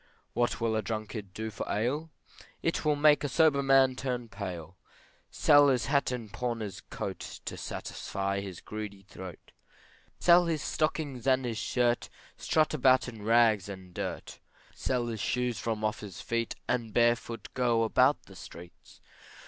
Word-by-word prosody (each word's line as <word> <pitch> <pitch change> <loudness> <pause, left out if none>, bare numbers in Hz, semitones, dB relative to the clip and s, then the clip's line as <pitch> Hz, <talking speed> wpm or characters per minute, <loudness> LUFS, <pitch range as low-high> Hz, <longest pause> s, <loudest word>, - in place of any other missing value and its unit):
What 120 +1 0
will 115 -1 0
a 110 - +1
drunkard 110 -2 -5
do 110 +3 -5
for - - -6
ale? 130 +10 -1 0.5
It 165 - 0
will 150 -1 +3
make 150 0 +5
a 145 - -1
sober 150 0 +4
man 135 -1 +5
turn 125 -3 -3
pale, 95 -4 -6 0.5
Sell 145 -1 +6
his 130 -4 +2
hat 140 -1 +1
and 115 -5 -5
pawn 120 0 -2
his 100 -4 -6
coat, - - -4 0.3
To - - -4
satisfy 100 0 -3
his 95 -4 -7
greedy 105 -2 -7
throat. 95 -3 -10 0.7
Sell 175 0 +6
his 160 -3 -1
stockings 150 -5 -1
and 130 -1 +3
his 115 -2 -2
shirt, 120 +2 +1 0.3
Strut 155 -1 +1
about 130 -3 +4
in 115 -3 -8
rags 110 -2 +4
and 95 -2 -9
dirt, - - -5 0.3
Sell 125 -2 -1
his 115 -2 -4
shoes 125 -2 -1
from 110 -2 -2
off 110 +1 0
his 100 -4 -8
feet, 115 -1 -2
And 115 -4 -1
barefoot 120 -2 +1
go 120 -3 +2
about 110 - +3
the - - -15
streets. 85 +1 -13
120 Hz, 160 wpm, -30 LUFS, 105-130 Hz, 0.7 s, Sell